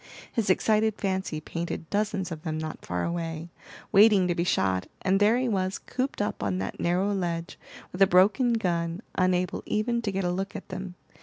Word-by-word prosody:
His 220 -4 0
excited 215 +3 +3
fancy 190 -6 -2
painted 165 +1 -5
dozens 205 -3 -1
of 155 -2 -5
them 155 -2 -3
not 155 0 -5
far 90 -1 -2
away, 165 -1 -3 0.4
waiting 205 -2 +6
to 175 - +1
be 170 - 0
shot, 95 - +1 0.2
and 190 +1 +3
there 210 +3 +4
he 255 0 0
was, 190 -3 0
cooped 255 -4 -2
up 205 - -3
on 95 -2 0
that 95 +1 -4
narrow 185 +4 +1
ledge, 170 -3 -3 0.3
with 180 - -7
a 195 - +8
broken 210 +7 +4
gun, 175 -3 -1
unable 185 -1 +1
even 235 +3 0
to 215 -3 -2
get 195 0 -1
a 175 - +1
look 195 +2 -3
at - - -7
them. 185 -1 -6
185 Hz, 195 wpm, -27 LUFS, 170-205 Hz, 0.4 s, a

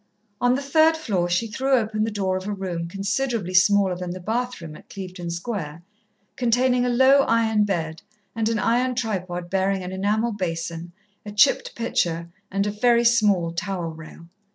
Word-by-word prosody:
On 245 +1 +3
the 280 - -3
third 315 +3 +4
floor 195 - -1
she 175 +6 +1
threw 260 +5 -1
open 215 -3 0
the - - -1
door 195 -3 -1
of 185 +1 -4
a 210 - -2
room 180 -4 -4
considerably 200 +2 -2
smaller 190 0 +4
than 180 0 -5
the 180 +1 -5
bath 245 +6 -2
room 160 -3 -9
at - - -16
Clevedon 185 -3 -7
Square, 170 -3 -5 0.5
containing 250 +1 +2
a 250 - +1
low 265 +3 +5
iron 220 -2 +2
bed, 165 -5 -3 0.3
and 225 -1 0
an 230 - 0
iron 245 +3 +1
tripod 185 -7 -3
bearing 190 0 0
an 180 - -6
enamel 210 +5 0
basin, 170 -3 -4 0.3
a 210 - -8
chipped 210 +7 +3
pitcher 170 -8 -1 0.2
and 200 +1 0
a 205 - -1
very 235 +2 +3
small 205 -8 +3
towel 175 -1 -3
rail. 160 +1 -12
200 Hz, 175 wpm, -23 LUFS, 175-235 Hz, 0.5 s, low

